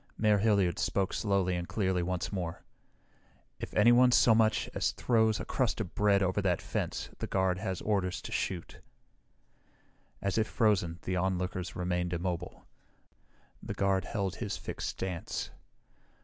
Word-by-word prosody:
Mayor 105 Hz, -2 st, +3 dB
Hilliard 100 Hz, -4 st, +2 dB
spoke 95 Hz, -2 st, 0 dB
slowly 100 Hz, -3 st, +1 dB
and 85 Hz, 0 st, -3 dB
clearly 95 Hz, -4 st, 0 dB
once 90 Hz, 0 st, -2 dB
more. 90 Hz, -4 st, -4 dB, 1.0 s
"If -, -, -6 dB
anyone 120 Hz, +3 st, +6 dB
so 120 Hz, -1 st, +6 dB
much 110 Hz, -1 st, +3 dB
as -, -, 0 dB
throws 110 Hz, -3 st, +2 dB
a -, -, -5 dB
crust 125 Hz, -4 st, 0 dB
of 100 Hz, -6 st, -4 dB
bread 100 Hz, -1 st, +3 dB
over 95 Hz, +2 st, +1 dB
that 90 Hz, -3 st, +1 dB
fence -, -, -3 dB
the -, -, -3 dB
guard 95 Hz, -1 st, +1 dB
has 95 Hz, -1 st, -3 dB
orders 95 Hz, -4 st, 0 dB
to -, -, -7 dB
shoot." 90 Hz, -3 st, -3 dB, 1.4 s
As 100 Hz, +2 st, 0 dB
if 110 Hz, -, +1 dB
frozen, 95 Hz, -8 st, +1 dB
the 90 Hz, 0 st, -1 dB
onlookers 90 Hz, 0 st, -2 dB
remained 90 Hz, 0 st, -1 dB
immobile. 90 Hz, 0 st, -4 dB, 1.0 s
The -, -, -5 dB
guard 95 Hz, -1 st, +1 dB
held 100 Hz, -4 st, -2 dB
his 105 Hz, -4 st, -3 dB
fixed -, -, -5 dB
stance. 90 Hz, -3 st, -4 dB
95 Hz, 150 wpm, -31 LUFS, 90-105 Hz, 1.4 s, anyone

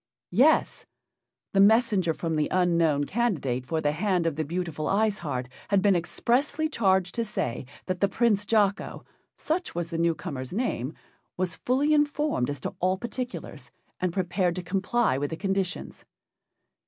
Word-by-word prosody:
Yes, 265 Hz, -, +3 dB, 0.7 s
the 195 Hz, -, +3 dB
messenger 205 Hz, -4 st, +4 dB
from 165 Hz, -2 st, -2 dB
the 150 Hz, -1 st, +1 dB
unknown 170 Hz, -5 st, +2 dB
candidate 145 Hz, -, -1 dB
for 160 Hz, -1 st, -1 dB
the 145 Hz, -, +2 dB
hand 180 Hz, +2 st, 0 dB
of 165 Hz, -3 st, 0 dB
the 155 Hz, -, -1 dB
beautiful 165 Hz, -1 st, -3 dB
Ice 210 Hz, +1 st, +1 dB
Heart 130 Hz, -6 st, -3 dB, 0.2 s
had 195 Hz, -1 st, +2 dB
been 200 Hz, -2 st, +5 dB
expressly 270 Hz, -, 0 dB
charged 190 Hz, -, +1 dB
to 235 Hz, -, -1 dB
say 125 Hz, -, -3 dB, 0.2 s
that 185 Hz, -1 st, -2 dB
the 200 Hz, -, +3 dB
Prince 210 Hz, -1 st, +2 dB
Jocko 205 Hz, -2 st, 0 dB, 0.3 s
such 335 Hz, -, -2 dB
was 170 Hz, 0 st, -3 dB
the 165 Hz, -, -2 dB
new 170 Hz, -1 st, +2 dB
comer's 140 Hz, -6 st, -6 dB
name 175 Hz, -, -2 dB, 0.4 s
was 180 Hz, -2 st, -1 dB
fully 280 Hz, +5 st, +1 dB
informed 295 Hz, -, +1 dB
as 145 Hz, -2 st, -4 dB
to -, -, -4 dB
all 185 Hz, +1 st, +1 dB
particulars, 245 Hz, +3 st, -6 dB, 0.3 s
and 185 Hz, -1 st, 0 dB
prepared 180 Hz, -1 st, 0 dB
to 180 Hz, -, -4 dB
comply 195 Hz, -, +1 dB
with 145 Hz, 0 st, -1 dB
the 160 Hz, -, -5 dB
conditions. 195 Hz, 0 st, -2 dB
185 Hz, 160 wpm, -27 LUFS, 165-220 Hz, 0.7 s, been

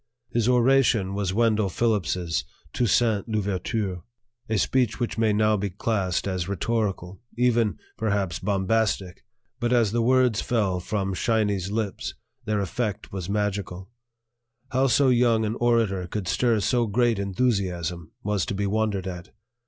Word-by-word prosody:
His 120 Hz, 0 st, +1 dB
oration 125 Hz, -5 st, +3 dB
was 100 Hz, -2 st, -1 dB
Wendell 110 Hz, -1 st, +2 dB
Phillips's 90 Hz, -, 0 dB, 0.3 s
"Toussaint 115 Hz, -3 st, +2 dB
L'Ouverture," 100 Hz, -2 st, -2 dB, 0.5 s
a 110 Hz, -, +1 dB
speech 125 Hz, +2 st, +1 dB
which 120 Hz, -2 st, -2 dB
may 110 Hz, -1 st, +3 dB
now 105 Hz, +1 st, +3 dB
be 100 Hz, 0 st, -2 dB
classed 95 Hz, -1 st, -1 dB
as 90 Hz, -2 st, -2 dB
rhetorical 100 Hz, -3 st, -2 dB, 0.2 s
even, 120 Hz, -3 st, +2 dB, 0.2 s
perhaps, 100 Hz, -6 st, -1 dB
bombastic; 100 Hz, -2 st, 0 dB, 0.4 s
but 120 Hz, 0 st, 0 dB
as 115 Hz, -5 st, +3 dB
the 120 Hz, +1 st, +1 dB
words 125 Hz, -2 st, +3 dB
fell 100 Hz, -6 st, 0 dB
from 95 Hz, +1 st, -2 dB
"Shiny's" 105 Hz, -3 st, 0 dB
lips 105 Hz, -1 st, -3 dB, 0.3 s
their 105 Hz, -2 st, 0 dB
effect 105 Hz, +2 st, -3 dB
was 95 Hz, -2 st, -5 dB
magical. 100 Hz, -2 st, -2 dB, 0.8 s
How 130 Hz, +1 st, +2 dB
so 130 Hz, +2 st, +4 dB
young 120 Hz, -3 st, +3 dB
an 105 Hz, -, -1 dB
orator 115 Hz, -6 st, +1 dB
could 95 Hz, 0 st, -4 dB
stir 115 Hz, +2 st, +2 dB
so 120 Hz, +3 st, +1 dB
great 115 Hz, 0 st, +2 dB
enthusiasm 90 Hz, -6 st, -1 dB
was 105 Hz, -2 st, 0 dB
to -, -, -2 dB
be 100 Hz, +1 st, -1 dB
wondered 100 Hz, -2 st, 0 dB
at. 90 Hz, +1 st, -6 dB
105 Hz, 140 wpm, -25 LUFS, 95-115 Hz, 0.8 s, so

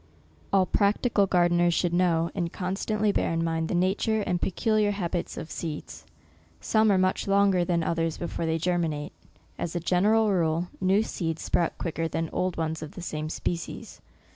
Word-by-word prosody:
All 195 Hz, -1 st, +4 dB
practical 205 Hz, +1 st, +2 dB
gardeners 175 Hz, -2 st, +3 dB
should 175 Hz, -2 st, 0 dB
know, 170 Hz, -2 st, +2 dB
and 175 Hz, -3 st, -2 dB
constantly 205 Hz, +3 st, -1 dB
bear -, -, 0 dB
in 165 Hz, 0 st, 0 dB
mind 165 Hz, -1 st, -1 dB
the -, -, 0 dB
nature 195 Hz, +4 st, +1 dB
and 180 Hz, -3 st, -1 dB
pecu 220 Hz, +4 st, -1 dB
liar 210 Hz, -1 st, +3 dB
habits 180 Hz, -4 st, -3 dB
of 160 Hz, -, -6 dB
seeds. 150 Hz, -, -6 dB, 0.5 s
Some 215 Hz, -, +3 dB
are 195 Hz, -, +4 dB
much 185 Hz, +1 st, +1 dB
longer 195 Hz, -2 st, +3 dB
than 170 Hz, -1 st, 0 dB
others 165 Hz, -1 st, -1 dB
before 170 Hz, -1 st, -3 dB
they 160 Hz, 0 st, +1 dB
germinate. 165 Hz, -4 st, -1 dB, 0.5 s
As 170 Hz, -, -3 dB
a -, -, +1 dB
general 205 Hz, +5 st, +3 dB
rule, 170 Hz, -1 st, +1 dB
new 190 Hz, +3 st, +3 dB
seeds 165 Hz, -7 st, -3 dB
sprout 170 Hz, -, 0 dB
quicker 165 Hz, -1 st, -2 dB
than 160 Hz, +1 st, -3 dB
old 180 Hz, -1 st, -1 dB
ones 160 Hz, -1 st, -2 dB
of 155 Hz, -, -7 dB
the -, -, -8 dB
same 155 Hz, -2 st, -4 dB
species. 170 Hz, +1 st, -5 dB
175 Hz, 175 wpm, -27 LUFS, 165-195 Hz, 0.5 s, All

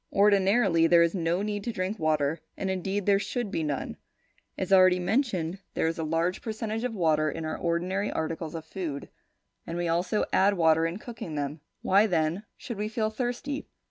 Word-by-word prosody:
Ordinarily, 195 Hz, -3 st, +4 dB
there 170 Hz, 0 st, +6 dB
is 170 Hz, -, +1 dB
no 175 Hz, +1 st, 0 dB
need 205 Hz, -1 st, -3 dB
to 235 Hz, -, -2 dB
drink 195 Hz, +1 st, -3 dB
water; 155 Hz, 0 st, +1 dB, 0.2 s
and 190 Hz, -, -1 dB
indeed, 190 Hz, +1 st, -2 dB
there 200 Hz, -1 st, +4 dB
should 215 Hz, +1 st, -3 dB
be 165 Hz, -, -1 dB
none. 145 Hz, -3 st, -3 dB, 0.6 s
As 190 Hz, 0 st, 0 dB
already 185 Hz, -1 st, +7 dB
mentioned, 185 Hz, -, 0 dB, 0.2 s
there -, -, +1 dB
is 165 Hz, +1 st, -1 dB
a -, -, -1 dB
large 165 Hz, +3 st, 0 dB
percentage 220 Hz, 0 st, -3 dB
of 250 Hz, -3 st, -2 dB
water 155 Hz, -4 st, +2 dB
in 165 Hz, +1 st, -5 dB
our 155 Hz, -, -2 dB
ordinary 180 Hz, +4 st, -1 dB
articles 160 Hz, 0 st, -3 dB
of 160 Hz, -1 st, -6 dB
food, 160 Hz, -5 st, -5 dB, 0.6 s
and 170 Hz, -, -4 dB
we 175 Hz, 0 st, -1 dB
also 175 Hz, +5 st, +1 dB
add 200 Hz, +2 st, +4 dB
water 160 Hz, -1 st, +4 dB
in 170 Hz, +3 st, -4 dB
cooking 215 Hz, -8 st, -7 dB
them. 145 Hz, +1 st, -3 dB, 0.2 s
Why 200 Hz, +3 st, +4 dB
then 170 Hz, +2 st, 0 dB
should 235 Hz, -7 st, -7 dB
we 210 Hz, -, -1 dB
feel 220 Hz, 0 st, -1 dB
thirsty? 250 Hz, +5 st, -3 dB
185 Hz, 190 wpm, -28 LUFS, 165-210 Hz, 0.6 s, already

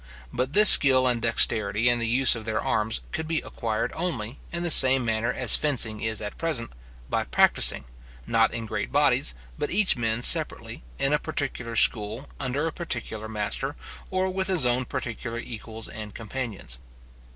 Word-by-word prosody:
But 130 Hz, +3 st, -3 dB
this 210 Hz, +1 st, +11 dB
skill 130 Hz, -2 st, +6 dB
and 120 Hz, -2 st, 0 dB
dexterity 110 Hz, -1 st, +1 dB
in 120 Hz, 0 st, +2 dB
the 115 Hz, -, -2 dB
use 125 Hz, +2 st, +3 dB
of 115 Hz, -, -8 dB
their 110 Hz, 0 st, -3 dB
arms 110 Hz, 0 st, -2 dB
could 160 Hz, 0 st, -5 dB
be 160 Hz, -1 st, -2 dB
acquired 110 Hz, -2 st, -5 dB
only, 135 Hz, -9 st, -5 dB
in 170 Hz, 0 st, -4 dB
the 175 Hz, -, -1 dB
same 130 Hz, -2 st, +8 dB
manner 110 Hz, +1 st, -2 dB
as 125 Hz, -3 st, +2 dB
fencing 120 Hz, -7 st, -1 dB
is 110 Hz, -1 st, -3 dB
at 105 Hz, -, -8 dB
present, 155 Hz, -9 st, -4 dB, 0.4 s
by -, -, -2 dB
practising, -, -, +2 dB, 0.4 s
not -, -, +1 dB
in 115 Hz, -, -6 dB
great -, -, -5 dB
bodies, -, -, +1 dB, 0.2 s
but -, -, -3 dB
each 200 Hz, +1 st, +2 dB
man 115 Hz, 0 st, -2 dB
separately, -, -, +3 dB, 0.2 s
in 135 Hz, +2 st, 0 dB
a 150 Hz, -, +1 dB
particular 135 Hz, -6 st, -5 dB
school, 110 Hz, +4 st, +1 dB
under 140 Hz, +3 st, -3 dB
a 165 Hz, -, -3 dB
particular 110 Hz, -9 st, -6 dB
master, 110 Hz, +6 st, -4 dB, 0.3 s
or 185 Hz, 0 st, -2 dB
with 190 Hz, 0 st, -2 dB
his 180 Hz, -8 st, 0 dB
own 125 Hz, +1 st, 0 dB
particular 115 Hz, 0 st, -6 dB
equals 115 Hz, -1 st, -8 dB
and 105 Hz, -2 st, -10 dB
companions. 110 Hz, -, -7 dB
120 Hz, 175 wpm, -24 LUFS, 110-140 Hz, 0.4 s, this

